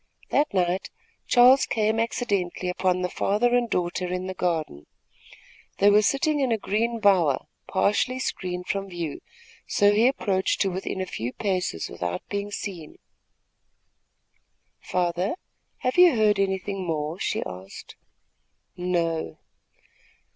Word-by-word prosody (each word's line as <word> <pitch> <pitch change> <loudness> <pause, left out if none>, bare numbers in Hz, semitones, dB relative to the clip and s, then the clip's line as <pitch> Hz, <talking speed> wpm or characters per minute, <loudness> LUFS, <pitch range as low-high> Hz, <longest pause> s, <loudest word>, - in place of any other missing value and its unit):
That 290 +1 +2
night 185 0 0 0.4
Charles 250 +2 +6
came 220 0 +1
accidentally 200 -6 -1
upon 180 0 0
the - - +1
father 230 +7 +1
and 240 -1 +1
daughter 180 0 -1
in 185 0 -2
the 190 - -4
garden. 160 - -2 0.9
They 205 +1 +5
were 210 +1 +6
sitting 295 +7 +1
in 265 -3 +1
a 225 - +2
green 225 +3 -1
bower, 180 -10 +3 0.2
partially 250 +5 +1
screened 180 -8 -4
from 195 0 -3
view, 170 -5 -5 0.5
so 205 0 +4
he 220 +4 +4
approached 195 -8 0
to 195 - +2
within 190 +1 -4
a - - -1
few 120 -9 -4
paces 185 - -2
without 90 0 -5
being 200 0 -3
seen. 185 -6 -7 1.8
"Father, 180 - -1 0.5
have 255 +7 +1
you 360 -6 +7
heard 210 -2 +3
anything 195 0 -1
more?" 160 0 -3
she - - -1
asked. 95 +1 -9 0.8
"No." 170 - -1
190 Hz, 130 wpm, -25 LUFS, 175-215 Hz, 1.8 s, you